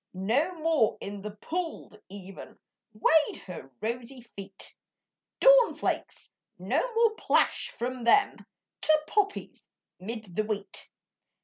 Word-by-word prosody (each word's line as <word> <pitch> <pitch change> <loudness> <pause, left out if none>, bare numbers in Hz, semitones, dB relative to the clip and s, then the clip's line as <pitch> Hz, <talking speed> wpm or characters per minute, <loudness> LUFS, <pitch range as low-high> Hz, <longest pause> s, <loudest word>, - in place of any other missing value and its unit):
No 250 - +1
more 310 -8 +2
in 200 0 -6
the 210 - -5
poolèd 320 - -5
Even 195 -1 -10 0.3
Wade 300 +8 +3
her 170 -8 -8
rosy 245 +3 -4
feet, 200 -4 -8 0.6
Dawn - - +7
flakes - - -3 0.3
no - - 0 0.2
more 460 -1 +5
plash - - +2
from 250 +1 -4
them 400 - +4 0.4
To 310 0 +4
poppies 405 +1 -1 0.4
'mid 215 -2 -6
the 215 - +1
wheat. 205 -2 -4
235 Hz, 115 wpm, -28 LUFS, 200-320 Hz, 0.6 s, Dawn